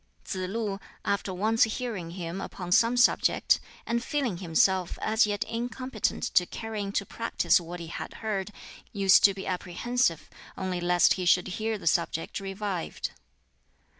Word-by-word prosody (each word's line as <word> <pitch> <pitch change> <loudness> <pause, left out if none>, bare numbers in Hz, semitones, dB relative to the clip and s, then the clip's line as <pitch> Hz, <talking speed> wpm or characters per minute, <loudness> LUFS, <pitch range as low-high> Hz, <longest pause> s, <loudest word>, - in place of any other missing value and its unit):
Tsz 185 -4 -3
lu, 205 -2 -2 0.3
after 200 -1 0
once 215 +5 0
hearing 220 -6 -4
him 175 +1 -4
upon 180 -2 -6
some 230 +6 +4
subject, 245 - +4 0.3
and 235 0 -1
feeling 260 -11 -1
himself 180 +1 +2
as 220 0 +3
yet 205 -1 -1
incompetent 240 0 -3
to 180 -7 +2
carry 225 -2 -5
into 200 0 -2
practice 230 -4 +1
what 175 +1 -7
he 170 - -6
had 165 - -7
heard, 210 -2 -3 0.4
used 195 -2 +5
to 200 -1 +5
be 195 - -6
apprehensive 185 +1 -1 0.3
only 185 -2 -2
lest 175 0 +4
he 185 - -3
should 180 0 +4
hear 220 +4 -2
the 185 - -12
subject 165 +1 0
revived. 195 - -4
195 Hz, 150 wpm, -28 LUFS, 180-225 Hz, 0.4 s, used